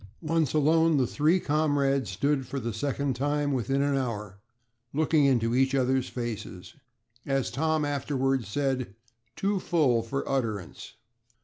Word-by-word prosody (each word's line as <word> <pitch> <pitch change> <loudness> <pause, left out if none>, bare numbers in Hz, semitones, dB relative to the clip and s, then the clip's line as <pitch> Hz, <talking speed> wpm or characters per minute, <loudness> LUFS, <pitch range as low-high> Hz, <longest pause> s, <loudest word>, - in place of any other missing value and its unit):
Once 160 -3 +1
alone, 160 +1 +4
the 130 - +3
three 155 +8 +2
comrades 145 - +1
stood 135 +7 0
for 140 - -4
the 115 -2 -4
second 140 +3 -2
time 145 +2 0
within 135 +2 0
an 140 -1 +1
hour, 105 -7 -3 0.5
looking 155 0 +3
into 120 -4 +2
each 130 +1 +2
other's 130 0 +1
faces. 110 -6 -6 0.5
As 135 -2 0
Tom 155 +3 0
afterwards 135 -4 -1
said, 130 -2 -2 0.4
"too 200 0 0
full 145 -10 +2
for 125 +5 -4
utterance." 110 -9 -3
135 Hz, 135 wpm, -27 LUFS, 120-145 Hz, 0.5 s, alone